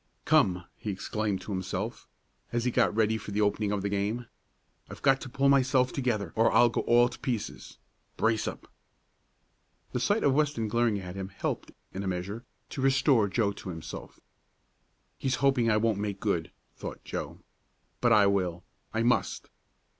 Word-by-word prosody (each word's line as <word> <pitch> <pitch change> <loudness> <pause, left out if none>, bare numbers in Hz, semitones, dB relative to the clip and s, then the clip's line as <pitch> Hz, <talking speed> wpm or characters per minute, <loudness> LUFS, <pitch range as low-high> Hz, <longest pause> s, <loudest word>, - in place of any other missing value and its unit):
"Come!" 90 -1 +3
he 110 - -4
exclaimed 100 0 -2
to 105 - -7
himself, 95 +4 -4 0.4
as 120 0 -1
he 125 - +2
got - - +2
ready 110 0 +2
for 105 - -9
the 105 +1 0
opening 105 0 +1
of 100 -2 -1
the - - 0
game. 105 +4 -1 0.6
"I've - - -10
got 135 -1 +4
to - - -7
pull 135 +2 +1
myself 130 -2 +3
together 110 - -1
or 115 +1 +4
I'll 120 - +6
go - - -1
all 120 +1 +5
to 120 - -9
pieces. 125 -6 -4 0.4
Brace 110 -1 +1
up!" - - -6 1.2
The 125 - -1
sight 205 - +1
of 140 - +4
Weston 140 -6 +1
glaring 115 -2 +2
at 90 -2 -7
him 95 -1 -4
helped, 95 -1 -4 0.2
in 95 - -4
a 100 - -3
measure, 95 +5 -3 0.3
to 135 - -5
restore 135 -4 +4
Joe 100 0 +1
to 95 - -8
himself. 80 -3 -8 1.0
"He's 130 - 0
hoping 130 -4 +2
I 105 - +4
won't 110 -2 +1
make 100 -1 -3
good," 90 -7 -1 0.3
thought - - -7
Joe. - - -5 0.6
"But 120 - +3
I 105 -3 +6
will! 90 -3 0 0.3
I 115 - +2
must!" 120 +1 0
110 Hz, 175 wpm, -29 LUFS, 100-125 Hz, 1.2 s, I'll